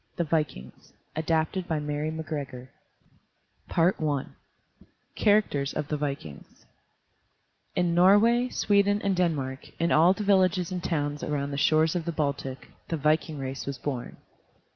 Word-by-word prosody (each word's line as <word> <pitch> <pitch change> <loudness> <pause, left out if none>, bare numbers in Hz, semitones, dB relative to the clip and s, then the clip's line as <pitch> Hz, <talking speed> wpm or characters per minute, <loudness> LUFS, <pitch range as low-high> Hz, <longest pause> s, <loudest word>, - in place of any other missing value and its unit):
THE 170 - 0
VIKINGS 150 - -3 0.2
ADAPTED 160 +3 0
BY 160 -2 0
MARY 150 +1 -2
MACGREGOR 145 -5 -6 1.0
I 155 -5 +1 0.9
CHARACTERS 200 -10 +2
OF 145 - -3
THE 150 - -1
VIKINGS 140 - -6 1.1
In 175 -1 +1
Norway, 210 +8 +5
Sweden, 205 -2 +2
and 200 -1 +1
Denmark, 145 -7 -2
in 170 0 +1
all 170 +4 +6
the 210 - -5
villages 185 -3 +2
and 180 -1 -4
towns 145 -3 -1
around 145 -1 -2
the 140 - -3
shores 155 +3 +3
of 170 -2 -2
the 170 - -1
Baltic, 140 -4 -3 0.2
the 165 - -2
viking 155 +1 +1
race 135 0 -5
was 140 -2 -3
born. 130 -3 -5
155 Hz, 135 wpm, -27 LUFS, 140-180 Hz, 1.1 s, all